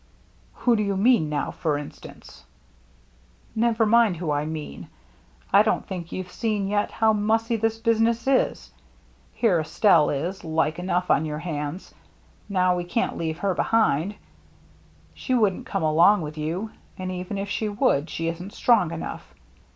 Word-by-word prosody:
" - - -33
Who 240 -2 +4
do 210 - 0
you 200 -2 -1
mean 205 -7 +3
now, 150 -1 -2
for 155 -3 -1
instance? 145 0 -11 0.4
" - - -33
" - - -34 0.3
Never 225 0 +2
mind 220 -4 +4
who 160 -2 -3
I 145 0 0
mean. 155 - -6 0.7
I 200 - +8
don't 215 - 0
think 175 -3 -6
you've 185 -1 -6
seen 210 -4 -1
yet 205 +1 0
how 220 -1 +2
mussy 225 +2 +1
this 225 0 0
business 230 0 +1
is. 270 -1 +1 0.6
Here 205 -8 +2
Estelle 160 0 +3
is, 170 +7 -3
like 160 0 0
enough, 180 0 0
on 155 +2 +2
our 150 - -4
hands. 155 +1 -5 0.6
Now 185 -2 +2
we 175 - -2
can't 175 +7 -1
leave 160 -1 -3
her 195 +2 0
behind. 205 -3 +1 1.0
She 255 - -2
wouldn't 210 -6 +1
come - - -2
along 170 +6 +5
with 150 0 -6
you; 170 +8 -3 0.3
and 185 0 -4
even 185 +2 -5
if 195 +1 -3
she 215 +1 -2
would, 165 -7 +1
she 165 - -3
isn't 175 +4 -5
strong 215 -9 +3
enough. 160 - -7
185 Hz, 165 wpm, -24 LUFS, 160-220 Hz, 1.0 s, I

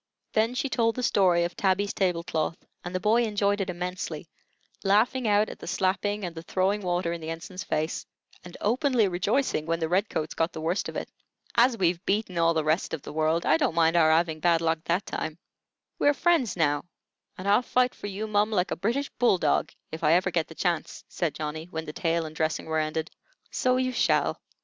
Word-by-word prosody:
Then 225 +3 +2
she 275 +2 0
told 230 -3 +1
the 250 - -3
story 180 -6 +3
of 170 0 -3
Tabby's 195 +1 +1
table 180 -3 0
cloth, 160 0 -2 0.3
and 175 +1 -6
the - - +1
boy 215 +5 +3
enjoyed 205 -2 +1
it 190 - -2
immensely, 175 -3 -4 0.6
laughing 220 +5 +2
out 210 +1 +3
at - - -9
the - - -9
slapping 195 +3 0
and 175 - -5
the 165 - -7
throwing 190 +4 0
water 175 -2 -1
in 170 - -6
the 160 - -5
ensign's 180 +3 -6
face, 155 -1 -2 0.4
and 175 -1 -11
openly 245 0 +2
rejoicing 190 - 0
when 165 0 0
the 160 - 0
red 190 +5 +1
coats 155 0 -3
got 165 +1 -1
the 160 - -6
worst 170 +5 -1
of - - -9
it. - - -5 0.4
"As 240 0 +4
we've 175 -2 +1
beaten 195 -3 -1
all 165 0 +3
the 160 - +1
rest 155 +2 0
of 155 - -12
the - - -8
world, 160 +2 +1
I 155 - +4
don't 160 - 0
mind 165 0 +3
our 160 -2 +5
'aving 160 -1 +2
bad 170 0 +3
luck 165 0 0
that 175 +4 0
time. 155 0 -4 0.6
We - - +2
har' 290 - +5
friends 320 - +2
now, 145 -2 +1 0.5
and 185 - -6
I'll 205 +4 +5
fight 250 0 +1
for - - -7
you, 205 +2 -4
mum, 210 0 +2
like 190 -4 0
a - - 0
British 235 +9 -1
bull 240 -6 +4
dog, 150 -4 +1 0.2
if 160 +1 -7
I 155 +1 +5
hever 180 +1 +2
get 165 -2 0
the 160 - -12
chance," 175 -2 -2
said 165 -5 -2
Johnny, 155 +1 -4
when 160 -2 -5
the 150 - -7
tale 165 0 0
and 155 0 -8
dressing 160 -1 -1
were 160 0 0
ended. 155 +1 -2 0.4
"So 255 0 +1
you 255 0 0
shall. - - +1
180 Hz, 220 wpm, -27 LUFS, 165-210 Hz, 0.6 s, our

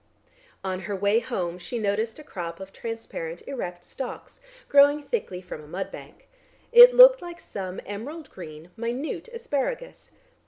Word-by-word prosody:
On 185 -1 -2
her 200 +1 -4
way 200 +3 +3
home 180 -8 -3
she 240 +7 -5
noticed 215 +1 -1
a 305 - -11
crop 170 - -6
of 190 0 -10
transparent 200 -7 -6
erect 180 -10 -5
stalks 265 - -8 0.3
growing 285 +1 +5
thickly 190 - -3
from 155 -4 -8
a - - -14
mud 190 +4 -5
bank. - - -12 0.4
It 485 +1 +10
looked - - +9
like 345 -1 -8
some 190 -2 -6
emerald 265 +11 -7
green 160 -1 -10
minute 245 - -4
asparagus. 470 - -4
225 Hz, 150 wpm, -26 LUFS, 185-295 Hz, 0.4 s, It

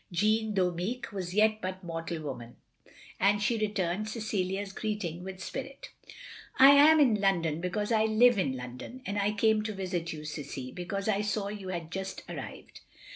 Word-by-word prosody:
Jeanne, 215 +4 +1
though 180 -2 +2
meek, 210 +10 -4
was 185 -2 -5
yet 215 0 +3
but 185 +1 -5
mortal 165 -1 -4
woman, 120 -5 -7 0.6
and 205 +1 +3
she 225 +3 +1
rettimed 205 -1 -1
Cecilia's 200 -3 -2
greeting 195 -6 -3
with 190 0 -7
spirit. 270 +1 -7 0.7
"I 270 +1 +9
am 300 +3 +7
in 250 -7 +5
Lrondon 170 -5 +1
because 205 +5 -2
I 220 -1 +3
live 220 +1 +5
in 135 -8 0
London; 125 - -8
and 205 +1 -2
I 200 +1 +2
came 215 +1 +2
to 215 0 -3
visit 180 -3 -3
you, 155 -1 -7
Cissie, 140 -4 -6
because 195 +3 -4
I 205 -1 +2
saw 210 -1 -1
you 205 -2 -7
had 170 -3 -5
just 190 +1 -5
arrived." - - -8
195 Hz, 175 wpm, -30 LUFS, 175-215 Hz, 0.7 s, I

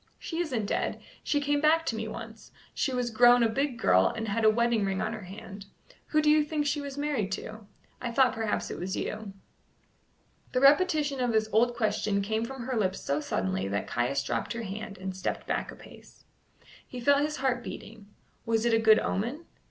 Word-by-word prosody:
"She 330 - -5
isn't 255 -11 -1
dead. - - -1 0.2
She 290 - +1
came 290 0 0
back 320 +2 +4
to 230 - -1
me 220 0 -3
once. 225 0 -9 0.2
She 270 - -1
was 250 -2 -1
grown 240 +1 +6
a - - +4
big 265 +2 -1
girl, 95 - +4
and 225 0 -3
had 220 +2 -1
a 220 - +7
wedding 235 0 +2
ring 195 -1 -1
on - - -2
her 215 -4 -7
hand. 200 +1 -10 0.4
Who 305 -1 +2
do 300 - +5
you 305 0 +5
think 295 0 -2
she 290 0 0
was 280 -1 -7
married 285 -9 -1
to? 215 +1 -7 0.3
I 245 - -2
thought 255 +1 +4
perhaps 220 -1 -2
it - - -6
was 190 +2 -3
you." 215 -2 -4 1.2
The 255 - +2
repetition 290 0 +4
of 245 -1 +1
this 220 -1 +1
old 240 +2 +3
question 215 -3 0
came 220 +2 -1
from 265 0 -7
her 255 +1 -3
lips 190 -2 0
so 140 +1 -1
suddenly 95 -7 -2
that 100 +1 -2
Caius 125 +3 -1
dropped - - -2
her 235 0 -5
hand 205 0 -6
and 190 0 -5
stepped 185 - -3
back - - -2
a - - -11
pace. - - -16 0.6
He 250 - -7
felt 280 +3 +4
his 300 +1 -1
heart 255 -2 0
beating. 215 -3 -9 0.4
Was 225 0 0
it 235 - +3
a 225 - +4
good 220 -1 +6
omen? 240 - -2
225 Hz, 210 wpm, -28 LUFS, 210-270 Hz, 1.2 s, a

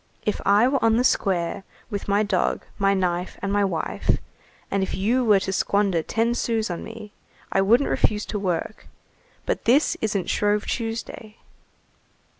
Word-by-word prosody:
if 210 - -1
I 205 +4 +5
were 275 +1 0
on 225 0 +4
the 245 - +2
square 190 -6 0 0.3
with 200 -1 -4
my 200 +1 +2
dog, 200 -4 0
my 195 0 +3
knife, 180 -1 -1
and 195 +1 -2
my 205 0 +3
wife, 180 -5 -1 0.5
and 200 - +1
if 190 - -2
you 235 +7 +1
were 210 -4 +5
to 190 - -2
squander 195 -3 +1
ten 225 +7 0
sous 225 -4 -1
on 170 - -5
me, 220 -2 -10 0.4
I 195 - +3
wouldn't 235 +8 +4
refuse 210 -1 +1
to 210 - -4
work, 185 +2 -3 0.6
but - - -2
this 270 +6 +4
isn't 205 -4 -1
Shrove 205 0 +1
Tuesday." 225 -2 -5
205 Hz, 165 wpm, -24 LUFS, 195-225 Hz, 0.6 s, I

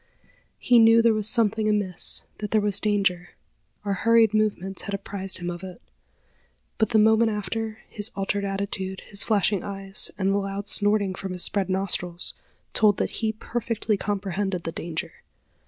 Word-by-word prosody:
He 245 -1 +4
knew 225 0 +6
there 230 -1 +4
was 215 0 0
something 220 -2 +2
amiss 205 -4 +3 0.2
that 210 - -4
there 215 - +3
was 205 -2 +2
danger. 195 -4 -1 0.5
Our 200 - 0
hurried 225 +1 +3
movements 200 -3 -1
had 200 - -4
apprised 195 -1 -2
him 175 -1 -4
of 175 0 -7
it; 185 -2 -9 1.0
but 220 - +2
the 225 - +2
moment 220 +1 +4
after, 220 +2 -4
his 210 0 -3
altered 200 +1 -2
attitude, 195 -1 -4
his 200 0 +1
flashing 205 -3 +1
eyes, 195 0 -2
and 195 0 +1
the 200 - +1
loud 195 0 -4
snorting 205 -1 +2
from 190 0 -6
his 180 - +1
spread 195 -2 +1
nostrils, 180 -2 -1 0.4
told 210 -3 +4
that - - -1
he 220 -1 +1
perfectly 225 -1 -2
comprehended 195 -2 -3
the 165 - -4
danger. 165 -1 -6
200 Hz, 165 wpm, -25 LUFS, 190-215 Hz, 1.0 s, knew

